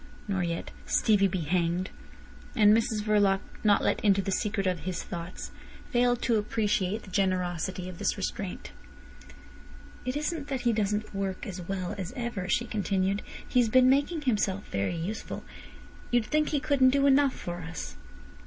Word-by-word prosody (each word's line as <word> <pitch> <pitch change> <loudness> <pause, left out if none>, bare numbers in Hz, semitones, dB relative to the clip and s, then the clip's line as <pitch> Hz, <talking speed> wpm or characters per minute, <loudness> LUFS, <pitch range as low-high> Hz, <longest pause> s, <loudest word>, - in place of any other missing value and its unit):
nor 195 -2 0
yet 170 -1 -3 0.2
"Stevie 205 -3 +4
be 185 -1 -2
hanged!" 175 +3 0 0.6
And 210 -2 +6
Mrs 220 -2 0
Verloc, 205 -2 +3 0.2
not 205 -2 +4
let - - +1
into 200 -2 +4
the 195 0 -1
secret 200 0 0
of 180 -2 0
his 180 +3 -4
thoughts, 170 0 -6 0.4
failed 245 0 +2
to 230 -3 +3
appreciate 210 -1 0
the 190 - -12
generosity 185 -1 -1
of 185 -2 -8
this - - 0
restraint. 195 -1 -4 1.3
"It 255 +3 -2
isn't 300 -1 -2
that 265 -3 -2
he 240 -1 +2
doesn't 210 0 -1
work 195 -1 -3
as 185 -2 -6
well 185 0 -3
as 185 +3 -4
ever," 235 -7 -3
she 240 - +2
continued. 200 -2 0 0.3
"He's 245 -3 +3
been 255 +2 +6
making 290 +3 +1
himself 205 -6 0
very 100 - -1
useful. 185 +7 -4 0.7
You'd 240 -2 +2
think 305 +4 +1
he 295 - +1
couldn't 275 -3 +4
do 280 +1 +3
enough 275 -1 +4
for 175 0 -5
us." 165 - -6
205 Hz, 160 wpm, -28 LUFS, 185-240 Hz, 1.3 s, And